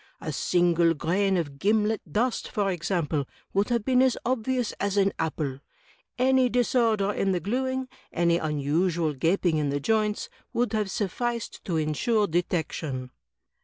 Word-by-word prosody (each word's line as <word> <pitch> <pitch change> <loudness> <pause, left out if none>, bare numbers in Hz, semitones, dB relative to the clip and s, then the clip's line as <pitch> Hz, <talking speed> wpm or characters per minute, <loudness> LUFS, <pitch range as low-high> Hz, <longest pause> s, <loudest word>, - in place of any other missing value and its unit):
A - - -4
single 170 -2 +3
grain 190 +5 +1
of 145 -5 -3
gimlet 215 +3 +2
dust, 240 +3 0
for 200 -2 0
ex 175 -2 -4
ample, 155 -7 0 0.3
would 200 +3 +1
have 235 -3 0
been 255 -1 +4
as 260 -1 +3
obvious 250 -1 0
as 200 0 -1
an 195 -1 +3
apple. 150 -4 -2 0.6
Any 260 0 +4
disorder 230 -4 +2
in 195 -1 +1
the 180 - 0
gluing 260 +6 -1 0.2
— - - -34
any 170 0 +2
unusual 155 +2 0
gaping 165 +3 +1
in 150 -2 0
the 140 +1 -1
joints 215 +4 0
— - - -33
^would 240 0 +1
have 210 -2 0
sufi&ced 235 +4 -3
to 180 - -3
insiu^ 165 - +1
detection." 155 -6 -2
195 Hz, 160 wpm, -26 LUFS, 160-230 Hz, 0.6 s, been